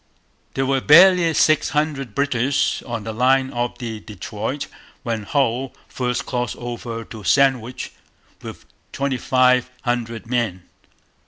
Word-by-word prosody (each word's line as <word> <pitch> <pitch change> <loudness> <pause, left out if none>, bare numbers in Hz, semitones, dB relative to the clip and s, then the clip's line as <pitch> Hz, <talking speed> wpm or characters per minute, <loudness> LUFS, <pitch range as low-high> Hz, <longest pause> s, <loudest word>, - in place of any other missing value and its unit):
There 135 - 0
were 135 0 +1
barely 175 +3 +7
six 155 0 +3
hundred 145 -6 -2
British 140 -1 +1
on 115 -3 -4
the 110 +1 -5
line 130 +3 +2
of 120 0 -3
the 115 -3 -5
Detroit 110 +6 -5 0.4
when 115 -4 -2
Hull 130 +2 -1
first 125 -1 -2
crossed 125 0 -2
over 120 -1 -6
to 110 -1 -10
Sandwich 130 +3 +1 0.5
with - - -10 0.3
twenty 135 -1 -1
five 125 +1 +3
hundred 120 -2 -2
men. 115 -7 -2
125 Hz, 130 wpm, -21 LUFS, 115-135 Hz, 0.5 s, barely